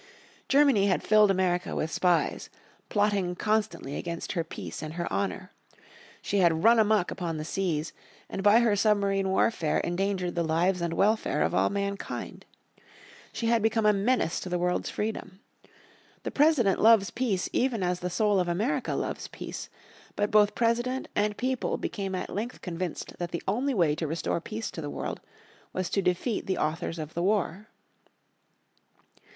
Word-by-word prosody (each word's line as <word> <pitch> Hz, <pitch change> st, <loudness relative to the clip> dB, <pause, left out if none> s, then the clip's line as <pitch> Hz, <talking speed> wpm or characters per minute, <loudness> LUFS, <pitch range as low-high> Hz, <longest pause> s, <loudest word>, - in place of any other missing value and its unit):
Germany 270 Hz, -8 st, +4 dB
had 185 Hz, -, +1 dB
filled 215 Hz, -1 st, +5 dB
America 185 Hz, -2 st, 0 dB
with 160 Hz, -, -2 dB
spies, 180 Hz, +1 st, +1 dB, 0.4 s
plotting 205 Hz, -4 st, +1 dB
constantly 210 Hz, -9 st, -1 dB
against 170 Hz, -1 st, -4 dB
her 170 Hz, -4 st, -1 dB
peace 165 Hz, -, -7 dB
and 155 Hz, +1 st, -6 dB
her 175 Hz, 0 st, -2 dB
honour. 195 Hz, -1 st, -2 dB, 0.7 s
She 205 Hz, -, 0 dB
had 165 Hz, -3 st, +3 dB
run 230 Hz, 0 st, +6 dB
amuck 215 Hz, -4 st, +3 dB
upon 170 Hz, -3 st, -3 dB
the 155 Hz, -, -5 dB
seas, 165 Hz, -3 st, -2 dB, 0.3 s
and -, -, -5 dB
by 205 Hz, +4 st, +6 dB
her 225 Hz, -3 st, +3 dB
submarine 200 Hz, -2 st, +2 dB
warfare 190 Hz, -4 st, +1 dB
endangered 180 Hz, 0 st, -1 dB
the 170 Hz, -, -1 dB
lives 170 Hz, +3 st, +1 dB
and 170 Hz, -1 st, -1 dB
welfare 215 Hz, +2 st, +2 dB
of -, -, 0 dB
all -, -, +3 dB
mankind. 200 Hz, 0 st, -4 dB, 0.8 s
She 230 Hz, -, -4 dB
had 230 Hz, 0 st, +3 dB
become 225 Hz, 0 st, +1 dB
a 210 Hz, -, +6 dB
menace 200 Hz, -3 st, +1 dB
to 185 Hz, -, -6 dB
the 180 Hz, -, 0 dB
world's 180 Hz, 0 st, -1 dB
freedom. 210 Hz, -3 st, -4 dB, 0.8 s
The -, -, -3 dB
President 280 Hz, -10 st, +3 dB
loves 220 Hz, -2 st, +5 dB
peace 220 Hz, -8 st, -1 dB
even 240 Hz, -6 st, +1 dB
as 180 Hz, 0 st, 0 dB
the 180 Hz, -, -3 dB
soul 205 Hz, +2 st, +2 dB
of 180 Hz, -, 0 dB
America 205 Hz, +11 st, -1 dB
loves -, -, -3 dB
peace. -, -, -7 dB, 0.5 s
But 205 Hz, 0 st, 0 dB
both 210 Hz, 0 st, +4 dB
President 240 Hz, +3 st, 0 dB
and 210 Hz, 0 st, 0 dB
people 255 Hz, 0 st, -1 dB
became 195 Hz, -2 st, -3 dB
at 185 Hz, -, -4 dB
length 225 Hz, +5 st, -4 dB
convinced 175 Hz, -1 st, -5 dB
that 175 Hz, -1 st, -3 dB
the 170 Hz, -, -5 dB
only 250 Hz, +7 st, 0 dB
way 165 Hz, -6 st, +3 dB
to 160 Hz, -, -2 dB
restore 165 Hz, +2 st, -2 dB
peace 220 Hz, +4 st, -5 dB
to 165 Hz, -, -6 dB
the 145 Hz, -, -5 dB
world -, -, -5 dB, 0.5 s
was 185 Hz, -1 st, -2 dB
to 200 Hz, -, +1 dB
defeat 185 Hz, +5 st, -1 dB
the 190 Hz, -, 0 dB
authors 160 Hz, +2 st, -2 dB
of 155 Hz, -1 st, -6 dB
the 170 Hz, -, -2 dB
war. 200 Hz, +1 st, 0 dB
195 Hz, 170 wpm, -28 LUFS, 175-215 Hz, 0.8 s, run